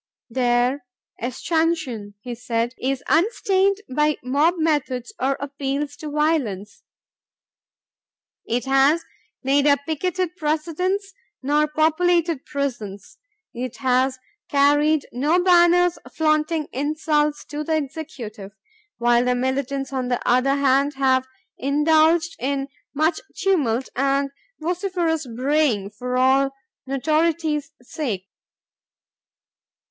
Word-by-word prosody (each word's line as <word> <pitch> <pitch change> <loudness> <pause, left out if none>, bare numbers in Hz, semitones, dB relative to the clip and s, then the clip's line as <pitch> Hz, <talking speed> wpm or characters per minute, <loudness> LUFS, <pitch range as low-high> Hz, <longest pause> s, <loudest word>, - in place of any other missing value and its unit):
Their 245 +2 +1 0.4
"escutcheon," 255 -5 -1
he 245 +1 -6
said, 235 0 -2
"is 270 +1 -1
unstained 390 +2 +2
by 300 +3 +1
mob 290 +7 +2
methods 295 - -1
or 270 +1 +1
appeals 280 +1 -3
to 305 - -6
violence. 290 - -1 1.7
It 240 +2 -1
has 270 +4 +3 0.4
neither 285 +2 +4
picketed 345 +4 -2
Presidents 355 +5 -1 0.3
nor 295 +2 +2
populated 325 0 +1
prisons.... 235 -9 -5 0.3
It 250 0 -5
has 260 0 +1 0.3
carried 290 +1 +3
no 295 +8 +2
banners 355 -1 +5
flaunting 310 0 +1
insults 300 +1 0
to 295 +1 -4
the 315 +1 0
Executive," 260 -9 -6 0.4
while 240 0 +3
the 250 0 +1
militants 270 +2 -2
on 255 -2 -1
the 245 -1 0
other 255 +3 +3
hand 280 +1 +2
have 260 -1 +2 0.3
indulged 315 +4 +3
in 275 +1 -2 0.3
"much 315 +3 +1
tumult 270 -11 +1
and 275 +1 +1 0.3
vociferous 340 -3 -1
braying, 250 -4 0
all 260 +2 +3
for - - -26 0.4
notoriety's 305 +1 0
sake." 235 -9 -4
285 Hz, 100 wpm, -22 LUFS, 255-315 Hz, 1.7 s, banners